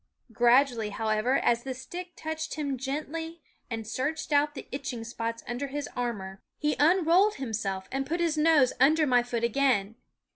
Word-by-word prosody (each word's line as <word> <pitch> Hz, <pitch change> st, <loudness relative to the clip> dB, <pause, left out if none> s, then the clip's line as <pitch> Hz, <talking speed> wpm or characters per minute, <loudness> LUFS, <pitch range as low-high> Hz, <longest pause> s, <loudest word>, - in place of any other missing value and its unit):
Gradually, 240 Hz, -1 st, +3 dB
however, 220 Hz, +4 st, +1 dB
as 235 Hz, 0 st, +2 dB
the 260 Hz, +1 st, -5 dB
stick 350 Hz, +8 st, -8 dB
touched 315 Hz, 0 st, -4 dB
him 290 Hz, -3 st, -2 dB
gently 310 Hz, +5 st, -5 dB, 0.3 s
and 225 Hz, -2 st, -4 dB
searched 295 Hz, +7 st, -2 dB
out 295 Hz, +1 st, +3 dB
the 260 Hz, -, -8 dB
itching 260 Hz, -4 st, -4 dB
spots 230 Hz, 0 st, -4 dB
under 245 Hz, +4 st, -3 dB
his 285 Hz, +1 st, -4 dB
armor, 205 Hz, -6 st, -4 dB, 0.2 s
he 300 Hz, 0 st, 0 dB
unrolled 360 Hz, +5 st, +4 dB
himself 205 Hz, -7 st, -3 dB
and 270 Hz, +1 st, -1 dB
put 340 Hz, +3 st, -1 dB
his 335 Hz, -2 st, +1 dB
nose 300 Hz, -4 st, +4 dB
under 310 Hz, +3 st, +5 dB
my 250 Hz, -3 st, +4 dB
foot 240 Hz, -1 st, -3 dB
again. 235 Hz, -4 st, +2 dB
270 Hz, 160 wpm, -28 LUFS, 235-310 Hz, 0.3 s, under